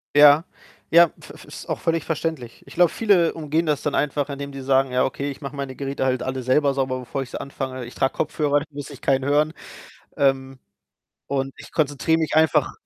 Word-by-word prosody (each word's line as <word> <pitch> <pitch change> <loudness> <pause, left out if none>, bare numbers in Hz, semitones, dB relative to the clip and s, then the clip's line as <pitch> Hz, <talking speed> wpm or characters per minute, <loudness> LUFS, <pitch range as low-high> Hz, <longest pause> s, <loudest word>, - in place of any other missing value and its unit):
Ja. 145 +1 +8 0.5
Ja, 170 0 +8
v - - -12
v - - -13
ist - - -10
auch - - -2
völlig 165 -1 0
verständlich. 155 -7 -4
Ich - - -12
glaube, 175 -2 +4
viele 195 -7 +3
umgehen 160 +1 -1
das 150 -3 0
dann 150 - -1
einfach, 145 0 0
indem 140 0 -5
die 135 - -8
sagen: 135 0 +2
„Ja, 125 0 +2
okay, 140 +2 -3
ich 135 - -10
mache 140 -1 -7
meine 140 -1 -4
Geräte 135 0 -3
halt 130 -1 0
alle 130 0 -3
selber 140 +3 +3
sauber, 130 -1 -1
bevor 125 +2 -4
ich 130 - -6
sie - - -5
anfange. 130 -2 -5
Ich 120 - -11
trage 135 - +1
Kopfhörer, 145 -1 0
da 145 - -7
muss 145 -1 -7
ich 140 -4 -11
keinen 135 -1 +1
hören. 150 +3 +2 0.6
Ähm, 135 -1 +1 0.7
und 135 -1 -2
ich - - -12
konzentriere 155 +1 +1
mich 160 -2 -1
einfach“ 160 -2 +3
140 Hz, 215 wpm, -23 LUFS, 135-150 Hz, 0.7 s, Ja